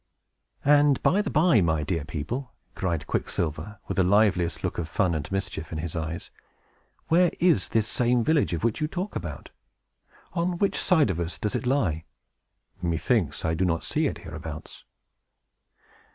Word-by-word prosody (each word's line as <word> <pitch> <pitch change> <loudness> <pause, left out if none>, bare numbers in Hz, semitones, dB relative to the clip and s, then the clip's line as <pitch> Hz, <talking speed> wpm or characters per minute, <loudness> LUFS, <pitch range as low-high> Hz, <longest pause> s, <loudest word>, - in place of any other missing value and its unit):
"And, 145 -1 +5
by 200 - +4
the 205 - -3
by, 155 - +4
my 80 -3 +1
dear 85 +1 -1
old 75 - -8
people," 120 - -4 0.2
cried 85 -5 -2
Quicksilver, 85 +6 -2
with - - -3
the 95 - +5
liveliest 90 -4 +2
look - - -2
of 85 -1 -3
fun 95 -2 +1
and 75 -1 -4
mischief 95 -4 -3
in 80 - -3
his 80 +1 -4
eyes, 80 0 -4 0.8
"where 175 +2 +5
is 175 -2 +3
this 110 -1 +1
same 120 0 +2
village 140 - +2
that 115 +5 -1
you 150 - +1
talk 185 +5 -4
about? - - -6 0.8
On 175 0 0
which 200 +2 +1
side 160 - +4
of 85 - -3
us 85 -2 -3
does 105 +6 -2
it 125 - -2
lie? 90 - +1 0.8
Methinks 85 - 0
I 80 - +1
do 85 +3 0
not 85 -2 0
see 155 0 0
it - - -3
hereabouts." 80 -2 -8
95 Hz, 165 wpm, -26 LUFS, -, 0.8 s, And